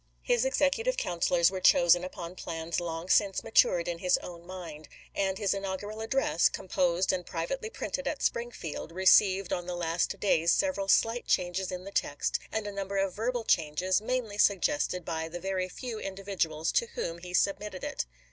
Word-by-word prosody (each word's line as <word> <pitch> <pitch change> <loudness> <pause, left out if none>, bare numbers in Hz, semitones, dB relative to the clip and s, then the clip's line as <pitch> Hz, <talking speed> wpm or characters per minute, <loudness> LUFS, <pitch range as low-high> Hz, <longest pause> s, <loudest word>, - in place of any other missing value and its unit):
His - - +2
executive 475 - +1
councilors 175 - +2
were 190 -1 -4
chosen 175 0 +5
upon 175 -1 -6
plans 165 -2 -4
long 165 0 -4
since 195 0 +3
matured 180 -6 +3
in 170 -1 -3
his 180 0 +3
own 170 -1 -10
mind; 165 -5 -8 0.3
and 190 -1 0
his 200 -2 +1
inaugural 200 +2 -4
address, 225 -6 +2
composed 180 0 0
and 180 -1 -2
privately 175 - -4
printed - - -4
at - - -3
Springfield, 235 -10 -3
received 190 +1 +4
on 175 0 -3
the 180 - -3
last 170 0 -1
days 170 -4 +3
several 280 -10 +1
slight 225 +4 +2
changes 180 +1 0
in 180 0 -5
the 200 - -8
text, 145 -6 -1
and 220 -1 -2
a 205 - -4
number 200 0 -4
of 195 -1 0
verbal 235 +3 -2
changes, 180 +2 +1
mainly 225 -3 -2
suggested 200 - +2
by 160 -1 -3
the 175 +2 -6
very 185 0 -2
few 230 +3 -6
indi 195 -1 -6
viduals 165 -5 -1
to 470 - +2
whom 170 +1 -3
he 180 +1 -9
submitted 200 +1 0
it. - - -3
185 Hz, 175 wpm, -29 LUFS, 175-210 Hz, 0.3 s, chosen